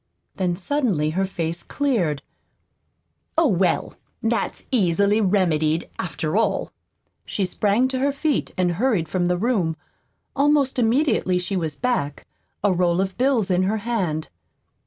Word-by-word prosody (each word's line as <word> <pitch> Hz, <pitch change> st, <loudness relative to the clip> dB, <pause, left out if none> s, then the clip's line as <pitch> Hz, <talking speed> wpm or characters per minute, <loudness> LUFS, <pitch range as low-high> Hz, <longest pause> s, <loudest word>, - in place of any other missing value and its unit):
Then 180 Hz, -2 st, 0 dB
suddenly 195 Hz, -, 0 dB
her 190 Hz, +4 st, 0 dB
face 170 Hz, -2 st, -3 dB
cleared. 190 Hz, -, -1 dB, 1.1 s
"Oh, 330 Hz, -, +5 dB
well, 185 Hz, -, +1 dB, 0.3 s
that's 225 Hz, +1 st, -1 dB
easily 200 Hz, -1 st, +3 dB
remedied, 170 Hz, -5 st, +1 dB
after 160 Hz, -2 st, -3 dB
all." 210 Hz, -3 st, +1 dB, 0.5 s
She 200 Hz, -, -2 dB
sprang 210 Hz, +6 st, +2 dB
to 260 Hz, -1 st, -2 dB
her 280 Hz, +2 st, +2 dB
feet 285 Hz, +1 st, -1 dB
and 180 Hz, -1 st, +2 dB
hurried 195 Hz, -3 st, +1 dB
from 175 Hz, +2 st, 0 dB
the 180 Hz, 0 st, +1 dB
room. 185 Hz, -7 st, 0 dB, 0.6 s
Almost 280 Hz, -2 st, +2 dB
immediately 230 Hz, -6 st, +2 dB
she 180 Hz, +2 st, -2 dB
was 160 Hz, -5 st, -1 dB
back 240 Hz, -, -2 dB, 0.4 s
a 205 Hz, -2 st, +3 dB
roll 175 Hz, 0 st, +2 dB
of 190 Hz, 0 st, -1 dB
bills 250 Hz, -7 st, +1 dB
in 180 Hz, 0 st, +3 dB
her 200 Hz, +4 st, +1 dB
hand. 180 Hz, -10 st, -1 dB
195 Hz, 135 wpm, -23 LUFS, 175-240 Hz, 1.1 s, Oh